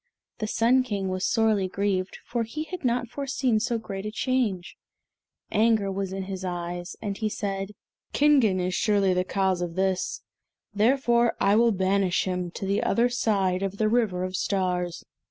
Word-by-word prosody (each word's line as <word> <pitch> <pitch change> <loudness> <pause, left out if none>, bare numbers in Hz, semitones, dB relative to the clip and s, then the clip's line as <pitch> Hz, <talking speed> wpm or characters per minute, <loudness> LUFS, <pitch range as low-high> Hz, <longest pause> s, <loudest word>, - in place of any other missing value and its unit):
The 215 - -2
Sun 235 +4 +3
King 205 -6 -3
was 185 0 -1
sorely 220 -4 +2
grieved, 190 -1 -1
for 235 - -2
he 230 +7 -4
had 360 +1 -7
not 245 -1 0
foreseen 260 -3 0
so 235 +1 0
great 195 -3 -6
a 210 - -3
change. 220 -6 -1 0.8
Anger 215 -3 +2
was 195 -1 -3
in 190 0 -4
his 190 -1 -6
eyes, 175 -1 -4
and 200 -1 -2
he 215 +1 -1
said, 195 -1 -4 0.4
"Kingen 270 -10 +4
is 180 0 -1
surely 200 -1 +2
the 180 0 +1
cause 190 -1 0
of 170 -1 -3
this, 190 -1 -1 0.5
therefore 235 +2 +3
I 200 +1 +4
will 230 +1 +4
banish 190 -1 +1
him 180 -1 -2
to 190 - -6
the 200 +1 +1
other 240 +1 +2
side 195 -6 +1
of 195 0 -3
the 215 - +2
River 215 -6 +1
of 185 0 -3
Stars." 180 -3 -1
200 Hz, 175 wpm, -26 LUFS, 185-230 Hz, 0.8 s, Kingen